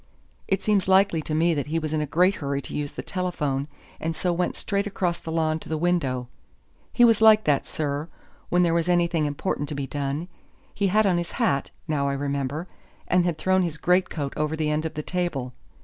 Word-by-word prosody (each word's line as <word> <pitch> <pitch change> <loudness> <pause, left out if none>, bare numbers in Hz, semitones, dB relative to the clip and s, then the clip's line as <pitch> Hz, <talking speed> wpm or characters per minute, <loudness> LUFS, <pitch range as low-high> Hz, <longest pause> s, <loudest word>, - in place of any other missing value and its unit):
It 195 - 0
seems 205 -3 +2
likely 190 -3 +4
to 155 0 -3
me 165 +2 +3
that 145 -2 -2
he 160 +2 -1
was 155 -1 -2
in 155 - +1
a 150 - -2
great 180 +6 +3
hurry 140 -1 -2
to - - -7
use 145 -1 -3
the 125 - -6
telephone, 155 -6 -2 0.3
and 165 0 -2
so 180 +1 0
went 175 +1 -1
straight 200 0 -1
across 180 -4 -1
the 160 - -6
lawn 160 -1 +1
to - - -11
the 160 - -1
window 145 -8 0 0.6
he 240 - +5
was 225 -2 +4
like 215 -1 +7
that, 145 -2 +1
sir, 145 0 -2 0.4
when 180 0 +3
there 170 -1 +2
was 170 +1 +1
anything 170 -3 +2
important 145 0 -2
to 150 - -4
be 140 -1 -2
done. 145 +4 -3 0.5
He 200 - +1
had 215 +3 +3
on 180 -3 +3
his 170 - -5
hat, 140 -1 0 0.2
now 140 -3 0
I - - -1
remember, 140 +3 -2 0.4
and 180 -1 +3
had 170 -3 0
thrown 185 +3 +2
his 170 -4 -2
great 180 +4 +2
coat 140 -4 -4
over 155 +1 -1
the 155 -1 0
end 155 +1 -1
of 160 - -4
the 150 - -3
table. 150 -9 -2
160 Hz, 225 wpm, -25 LUFS, 145-180 Hz, 0.6 s, like